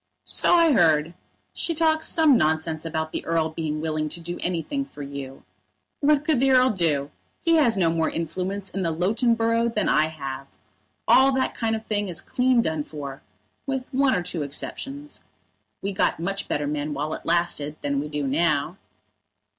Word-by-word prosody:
"So - - +3
I 335 -2 +5
heard. 160 - +3 0.4
She 335 - -2
talks 315 0 +2
some 315 -4 +5
nonsense 160 -2 0
about 160 -1 -3
the - - -4
Earl 165 -1 0
being 155 -1 -3
willing 155 -1 -2
to 170 - -6
do 175 +1 -6
anything 180 - -2
for 210 - -10
you. 140 -1 -8 0.6
What 295 0 +3
could 305 -5 +2
the 270 +1 +3
Earl 255 -1 +5
do? 150 -7 0 0.3
He 330 -1 +4
has 240 -9 +3
no 170 -3 +3
more 165 -1 0
influence 185 +4 -4
in 195 - -3
the 170 - 0
Loughton 215 +9 +1
borough 230 +1 +1
than 215 -3 -1
I 155 +1 +3
have. 135 -3 -6 0.6
All 265 +1 +6
that 260 0 0
kind 225 -1 -1
of 220 0 -6
thing 205 -2 -1
is 175 -3 0
clean 250 +3 +2
done 160 -2 -1
for, 140 -3 -8 0.5
with 265 -2 -2
one 270 -2 +2
or 180 - -1
two 175 -2 -4
exceptions. 275 - -5 0.6
We 200 - -1
got 185 - +1
much 195 +4 -3
better 145 - -1
men 145 0 -3
while 150 +3 -2
it - - -6
lasted 170 -3 0
than 140 -1 0
we 150 - -3
do 150 -1 -3
now." 150 +3 +1
170 Hz, 185 wpm, -24 LUFS, 155-240 Hz, 0.6 s, All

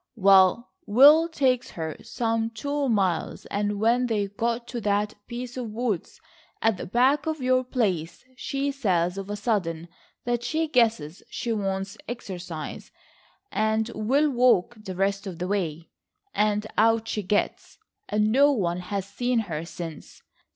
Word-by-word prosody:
Well, 195 +2 +5 0.2
Will 290 +9 +7
takes 260 -6 +1
her 160 -2 -5
some 225 -1 -1
two 285 +5 -2
miles, 190 -7 0
and 205 0 -1
when 240 +3 +3
they 205 -4 -1
got 235 +3 -2
to 240 -1 -4
that 205 +1 0
piece 245 +1 -6
of 245 -3 -4
woods 220 -4 -3 0.4
at 225 -3 +2
the - - -6
back 265 - +2
of 315 -1 -1
your 255 0 +2
place 195 - -2
she 275 +3 -2
says 185 -9 0
of 195 0 -7
a 205 - -2
sudden 185 -7 -1 0.4
that 240 -1 0
she 320 +6 -1
guesses 220 - +1
she 235 - -2
wants 195 0 -3
exercise, 180 -9 -7 0.6
and 220 +1 0
will 275 +8 +2
walk 240 -5 +3
the 210 -4 -8
rest 195 +1 0
of 180 -3 -6
the 180 +1 -3
way, 170 -5 -2 0.4
and 210 0 +1
out 225 0 +3
she 215 - -2
gets, 205 +2 -1 0.3
and 210 +1 +2
no 280 +4 +5
one 180 -9 0
has 195 +1 -3
seen 245 +4 -1
her 165 -7 -4
since. 165 -2 -9
215 Hz, 150 wpm, -26 LUFS, 195-245 Hz, 0.6 s, Will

